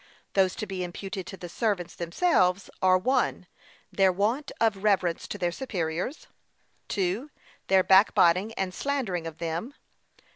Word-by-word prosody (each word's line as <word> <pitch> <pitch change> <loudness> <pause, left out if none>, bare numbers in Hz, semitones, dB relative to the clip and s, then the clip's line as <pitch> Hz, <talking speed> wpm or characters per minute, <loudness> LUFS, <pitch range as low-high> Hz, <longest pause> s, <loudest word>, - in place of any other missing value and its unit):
Those 190 -2 +3
to - - -4
be 190 -3 -4
imputed 190 +1 -6
to 195 - -8
the 175 - -7
servants 190 -2 -1
themselves 180 - +1
are: 185 0 +5
(1.) 250 -2 0 0.5
Their 190 -1 +4
want 215 +10 -1
of 210 -4 +1
reverence 190 -5 +1
to - - -5
their 175 -1 0
superiors. 180 - -3 0.6
(2.) 200 +8 -1 0.4
Their 190 -1 +5
backbiting 190 0 +5
and 190 -1 -2
slandering 220 -13 -2
of 160 -1 -8
them. 170 - -4
190 Hz, 140 wpm, -27 LUFS, 175-215 Hz, 0.6 s, are